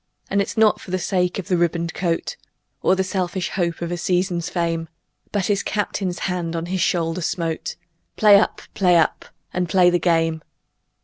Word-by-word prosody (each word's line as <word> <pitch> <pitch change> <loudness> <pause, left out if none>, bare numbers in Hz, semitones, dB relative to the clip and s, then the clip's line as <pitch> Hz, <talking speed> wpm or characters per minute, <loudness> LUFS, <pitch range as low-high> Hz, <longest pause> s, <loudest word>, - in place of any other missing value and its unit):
And 200 +1 +3
it's 200 - -4
not 220 -1 +4
for - - -11
the 185 - 0
sake 180 -1 0
of 195 0 -6
a - - +4
ribboned 170 -1 0
coat 170 - -2 0.5
Or 185 - +3
the 190 - +1
selfish 185 -1 -2
hope 170 -2 -2
of 170 - -3
a 175 - -2
season's 180 -1 0
fame, 165 -2 -2 0.4
But 200 -3 0
his 200 -1 +1
Captain's 195 -3 -2
hand 175 -3 -2
on 165 0 -2
his 185 +1 -2
shoulder 165 +1 0
smote; 165 -1 -2 0.4
"Play 205 -2 +7
up! 215 - -1
Play 180 -3 +4
up! 160 - +1 0.3
And 180 -1 -1
play 180 -1 +5
the 175 - +2
game!" 165 -2 +1
180 Hz, 185 wpm, -22 LUFS, 170-190 Hz, 0.5 s, Play